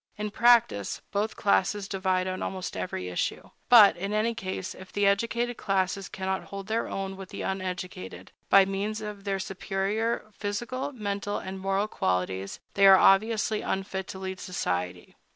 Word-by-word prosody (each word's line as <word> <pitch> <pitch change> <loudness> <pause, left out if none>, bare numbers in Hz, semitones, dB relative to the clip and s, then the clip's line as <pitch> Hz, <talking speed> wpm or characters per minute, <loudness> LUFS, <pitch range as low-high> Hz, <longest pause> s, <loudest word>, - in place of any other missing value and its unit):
In 210 0 -3
practice, 230 - +3
both 205 +2 -1
classes 200 0 +1
divide 190 -2 0
on 185 0 -3
almost 185 -1 -4
every 90 - -4
issue. 90 - -3 0.2
But, 220 -5 +9
in 195 +4 -4
any 220 +2 +1
case, 190 -4 -5
if 190 -1 -12
the 205 0 +1
educated 235 +4 +1
classes 195 -1 -1
cannot 190 -2 -3
hold 195 -1 -7
their 220 +2 -1
own 195 0 -4
with 190 -1 -9
the - - -6
uneducated, 180 - -5 0.2
by 195 -1 +7
means 200 +3 -2
of 210 -2 -7
their 195 -1 0
superior 195 +4 -2
physical, 240 +8 -3
mental, 205 -4 -3
and 190 0 -6
moral 195 +2 0
qualities, 95 - -2
they 195 0 +6
are 190 0 +9
obviously 215 +2 +3
unfit 190 0 -3
to - - -7
lead 190 -1 -5
society. 90 - -3
195 Hz, 160 wpm, -27 LUFS, 190-210 Hz, 0.2 s, But